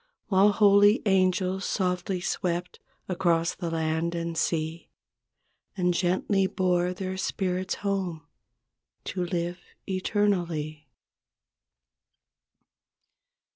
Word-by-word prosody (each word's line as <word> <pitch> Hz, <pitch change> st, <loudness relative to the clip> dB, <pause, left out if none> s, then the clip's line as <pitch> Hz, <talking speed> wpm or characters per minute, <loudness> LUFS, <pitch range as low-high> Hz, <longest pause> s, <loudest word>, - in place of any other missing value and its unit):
While 200 Hz, +1 st, +5 dB
holy 205 Hz, +1 st, +5 dB
angels 190 Hz, -1 st, +2 dB
softly 180 Hz, 0 st, -1 dB
swept 175 Hz, -1 st, -2 dB, 0.3 s
Across 170 Hz, -3 st, +1 dB
the 170 Hz, -3 st, -4 dB
land 160 Hz, +1 st, -1 dB
and 170 Hz, 0 st, -3 dB
sea 160 Hz, 0 st, -2 dB, 0.9 s
And 180 Hz, -1 st, +2 dB
gently 190 Hz, +2 st, +1 dB
bore 180 Hz, -1 st, +1 dB
their 185 Hz, 0 st, -4 dB
spirits 185 Hz, 0 st, -1 dB
home 190 Hz, -6 st, -3 dB, 0.8 s
To 180 Hz, -1 st, -2 dB
live 175 Hz, 0 st, -2 dB, 0.3 s
eternally. 175 Hz, -7 st, -1 dB
180 Hz, 85 wpm, -27 LUFS, 170-190 Hz, 0.9 s, While